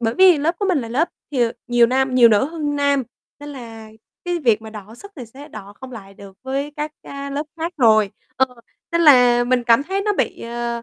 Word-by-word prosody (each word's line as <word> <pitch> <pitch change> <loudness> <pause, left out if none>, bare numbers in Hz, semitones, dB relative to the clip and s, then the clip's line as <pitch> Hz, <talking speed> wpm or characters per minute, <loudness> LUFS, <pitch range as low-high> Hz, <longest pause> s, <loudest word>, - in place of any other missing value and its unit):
bởi 225 -1 -1
vì 370 -2 +6
lớp 320 +4 0
của 405 - -1
mình 360 -5 +2
là 230 - -7
lớp 280 +9 0 0.2
thì, 265 -4 0
ờ, 230 -1 0
nhiều 240 -1 +4
nam 260 +1 0
nhiều 245 -2 +7
nữ 215 +2 +3
hơn 295 -1 -4
nam, 280 -1 +1 0.4
nên 290 - -9
là 225 -5 -10 0.3
cái 350 -1 -2
việc 230 -8 +1
mà 220 - -10
đọ 215 0 -11
sức 405 +11 -13
thì 250 -4 -8
sẽ 275 +6 -13
đọ 200 -8 -11
không 260 -1 -10
lại 195 -4 -11
được 195 -1 -14
với 275 +2 -4
các, 300 0 -4
a, 280 0 -8
lớp 290 +2 -4
khác 335 +2 -4
rồi. 220 -6 +4 0.3
Ờ, 265 - +3 0.5
nên 335 - +1
là 245 -6 +5
mình 245 0 0
cảm 235 +2 +4
thấy 385 +6 -3
nó 420 - 0
bị, - - -2
ờ, 235 0 -4
260 Hz, 240 wpm, -20 LUFS, 230-295 Hz, 0.5 s, nhiều